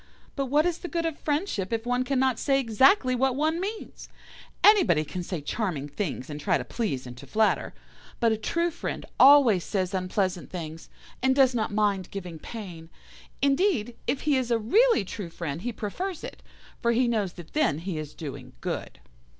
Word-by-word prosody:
But 275 -2 -1
what 295 +4 +3
is 350 -1 0
the 355 - -6
good 335 -1 -2
of 325 -2 -3
friendship 290 - -1
if 225 0 -2
one 245 +1 +1
cannot 260 -2 +1
say 275 -1 +2
exactly 255 - +4
what 260 +1 +1
one 315 +4 +1
means? 415 +4 -6 0.5
Anybody 355 - +5
can 180 +4 -5
say 175 -2 -4
charming 150 -3 -2
things 145 -3 -4
and 150 -1 -7
try - - +2
to - - -6
please 180 - -3
and 125 -1 -8
to 140 +2 -11
flatter, 220 +8 +1 0.5
but 230 -2 +3
a - - +2
true 335 +10 0
friend 335 - -5
always 260 -9 +7
says 190 -2 -2
unpleasant 185 -1 -1
things, 165 -3 -7 0.3
and 260 +1 +3
does 265 -2 +5
not 220 -3 -1
mind 205 -3 0
giving 180 -5 -7
pain. 175 -8 -8 0.5
Indeed, 275 - +2
if 275 - 0
he 295 -3 +2
is 255 -2 -1
a 235 - +3
really 335 - +3
true 190 -1 -6
friend 165 -2 -5
he 245 - -2
prefers 335 - -4
it, - - -8 0.4
for 235 -1 +2
he 245 +1 +2
knows 210 -6 0
that 175 -3 -12
then 295 - +2
he 165 -1 -4
is 150 -1 -7
doing 150 -5 -8
good. - - -5
225 Hz, 190 wpm, -27 LUFS, 180-275 Hz, 0.5 s, always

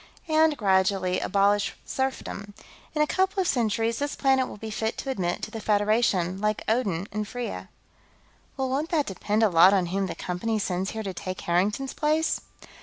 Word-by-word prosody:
And, 315 -1 +3
gradually, 190 -2 +2
abolish 200 +1 +2
serfdom. 205 -6 -4 0.4
In 300 - +4
a - - +3
couple 380 +5 0
of 370 - +1
centuries, 230 -1 +1
this 285 0 -2
planet 265 -2 +2
will - - -9
be 220 +1 -7
fit 220 +1 -2
to 270 - -3
admit 180 -7 -2
to - - -4
the 225 - -5
Federation, 205 -4 +1
like 210 0 0
Odin 205 -7 0
and 210 0 -3
Freya." 245 +1 -5 0.9
"Well, 265 -1 0
won't 285 +5 -1
that 310 -5 +1
depend 210 +3 -1
a - - +6
lot 180 +3 +7
on 185 -2 +2
whom 195 0 0
the - - -5
Company 200 +5 -2
sends 190 -1 -1
here 220 0 -4
to 195 -2 -4
take 185 +1 -5
Harrington's 205 +10 0
place?" 310 +1 +1
215 Hz, 180 wpm, -26 LUFS, 195-265 Hz, 0.9 s, lot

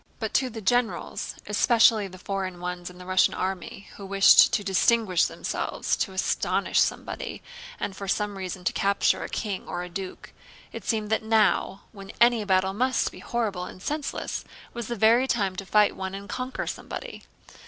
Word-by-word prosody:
But 220 -3 -4
to 260 -1 +2
the 225 -2 -7
generals, 245 +4 -1
especially 225 -3 +4
the 185 0 -12
foreign 185 -1 -4
ones 180 0 -5
in 180 - -14
the 180 - -11
Russian 185 0 +3
army, 190 +1 -4
who 200 - -9
wished 195 0 +7
to 205 - 0
distinguish 195 -1 +3
themselves, - - -2
to 195 - -1
astonish 190 0 0
somebody, - - -2 0.4
and 195 - -3
for 195 +1 -7
some 205 +1 -1
reason 185 -1 -6
to - - 0
capture 200 0 +2
a - - -6
king 205 -4 -4
or 175 - -4
a 180 - -7
duke—it 185 +1 -9
seemed 215 -2 -1
that 220 - +2
now—when 210 -2 0
any 235 -2 +5
battle 190 -1 +2
must 255 +4 +1
be - - -12
horrible 210 -7 -2
and 185 - -11
senseless—was 280 -5 -5
the 240 - -3
very 230 +4 +4
time 200 -7 0
to 195 - -6
fight 210 +2 +4
and 195 +1 -6
conquer 255 +4 -4
somebody. - - -6
200 Hz, 165 wpm, -26 LUFS, 190-225 Hz, 0.4 s, wished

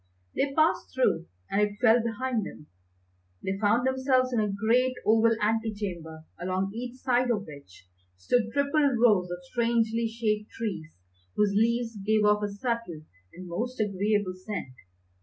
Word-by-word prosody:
They 275 - +1
passed 315 +1 +2
through 170 -10 +1 0.2
and 200 - +2
it 205 0 0
fell 240 -1 +5
behind 235 0 -2
them. 150 - -9 0.8
They 195 +1 -2
found 220 +4 +2
themselves 260 -1 +2
in 235 - +2
a 210 -1 0
great 235 +6 +2
oval 225 +1 +4
ante 220 +1 0
chamber 170 -6 -6 0.2
along 185 +2 -1
each 245 +2 -6
side 255 -1 +1
of 210 -4 0
which 140 -12 -14 0.3
stood 225 - +1
triple 280 +1 +2
rows 210 -6 +4
of 175 - -4
strangely 230 -1 +1
shaped 215 -2 -2
trees 175 - -5 0.4
whose 205 -1 +2
leaves 230 +1 +1
gave 215 +2 +1
off 210 0 +4
a 205 - -1
subtle 205 -6 -4 0.3
and 180 +1 -9
most 235 +9 -4
agreeable 205 -1 0
scent. 185 -7 -6
220 Hz, 155 wpm, -27 LUFS, 195-240 Hz, 0.8 s, fell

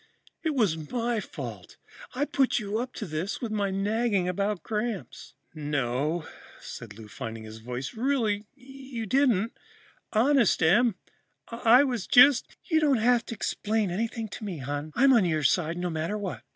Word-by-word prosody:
It 320 -3 -1
was 160 - 0
my 240 -2 0
fault. - - -8 0.4
I 280 +3 +1
put 270 -3 +1
you 215 0 -2
up 250 +1 -4
to 215 - -4
this 165 +4 -3
with 235 -3 -4
my 205 -2 0
nagging 200 0 0
about 200 +1 -1
Gramps." 215 -2 -4 0.2
"No," 145 +1 -1 0.3
said 105 -3 -9
Lou, 110 -1 -10
finding 115 -1 -7
his 110 0 -10
voice, 125 - -5
"really 225 -4 0
you 265 -3 -8
didn't. 235 -2 +2 0.6
Honest, 235 - +3
Em, 215 +6 +4 0.5
I 235 +3 +5
was 245 -7 -2
just 255 +2 +6
" - - -39
"You 320 - +5
don't 290 -4 +3
have 240 +1 +3
to 230 - -5
explain 215 -2 -1
anything 225 +4 -2
to 220 - -8
me, 195 -5 -4
hon. 145 +3 -4
I'm 270 +1 +5
on 230 -5 +5
your 160 -4 0
side, 165 +4 +1
no 175 0 -2
matter 165 +6 -2
what." 200 -3 -5
210 Hz, 165 wpm, -27 LUFS, 165-240 Hz, 0.6 s, just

